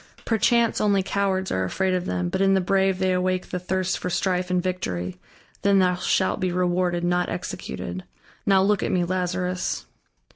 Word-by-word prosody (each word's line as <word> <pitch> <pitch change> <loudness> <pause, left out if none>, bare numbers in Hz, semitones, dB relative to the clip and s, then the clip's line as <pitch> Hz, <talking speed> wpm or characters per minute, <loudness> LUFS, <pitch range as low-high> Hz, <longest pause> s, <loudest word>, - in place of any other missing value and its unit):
Perchance, 235 +1 +2
only 200 -2 +3
cowards 190 -1 -1
are 95 - 0
afraid 185 - 0
of 180 -1 -1
them, 90 -1 -1
but 190 - -1
in 195 0 +4
the - - +4
brave 190 0 +2
they 185 0 +1
awake 185 0 0
the 180 - -2
thirst 185 +1 -1
for 180 - -3
strife 180 0 0
and 180 0 +2
victory; 90 - -3 0.4
then 200 0 +4
thou 180 -1 +4
shalt 185 +2 0
be 185 -2 0
rewarded, 180 -1 0
not 175 0 +1
executed.... 90 +1 -5 0.4
Now, 190 -1 +4
look 205 0 +2
at - - -1
me, 180 -1 +2
Lazarus." 180 0 -2
185 Hz, 180 wpm, -24 LUFS, 180-190 Hz, 0.4 s, in